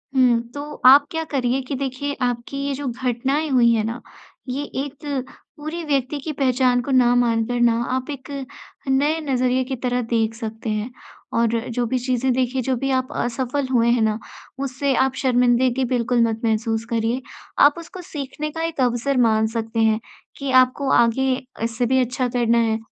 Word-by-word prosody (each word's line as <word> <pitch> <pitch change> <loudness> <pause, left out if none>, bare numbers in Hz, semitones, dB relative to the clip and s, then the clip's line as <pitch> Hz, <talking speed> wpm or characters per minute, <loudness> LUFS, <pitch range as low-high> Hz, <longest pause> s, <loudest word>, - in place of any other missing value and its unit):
हुँ, 245 -3 +4
तो 290 +1 -7
आप 280 +3 +9
क्या 320 -1 -2
करिए 260 -1 0
कि 265 +2 -5
देखिए 275 +2 -3
आपकी 245 +2 -2
ये 285 - -1
जो 275 0 -4
घटनाएँ 260 +5 -1
हुई 245 -3 +4
हैं 220 -2 +1
ना 230 +2 -4 0.5
ये 275 +3 -2 0.2
एक 285 -2 -5 0.3
पूरे 315 +3 -5
व्यक्ति 280 -2 -1
की 305 +3 -4
पहचान 255 -2 +2
को 275 - -5
ना 250 -2 +4
मानकर 240 0 +1
ना 235 -1 +5 0.2
आप 260 +1 -2
एक 280 -2 -7 0.6
नए 290 +4 +2
नज़रिए 255 -3 +1
की 260 +1 -4
तरह 250 0 -1
देख 225 -1 0
सकते 225 0 -5
हैं। 215 +3 -2 0.4
और 230 -1 +2 0.2
जो 240 +1 -1
भी 255 +2 0
चीज़ें 255 +1 0
देखिए 255 +1 0
जो 260 - +2
भी 270 +3 -2
आप 260 -1 0
असफल 260 +3 -2
हुए 235 -2 +3
हैं 240 -1 +2
ना 215 -1 +1 0.4
उससे 275 0 -1
आप 265 0 +2
शर्मिंदगी 250 0 +2
बिल्कुल 240 -1 +1
मत 225 0 -3
महसूस 225 0 0
करिए 230 +2 0 0.4
आप 290 - +6
उसको 345 +2 -9
सीखने 300 -2 -5
का 325 - -5
एक 330 -3 -3
अवसर 250 +2 +1
मान 220 0 +2
सकते 225 0 -3
हैं 220 0 +3 0.4
कि 275 -1 -3
आपको 255 +2 -1
आगे 240 +3 +3 0.4
इससे 230 +2 -1
भी 260 +2 +2
अच्छा 250 +1 -1
करना 240 -1 +1
है। 225 -1 +1
255 Hz, 180 wpm, -22 LUFS, 235-270 Hz, 0.6 s, आप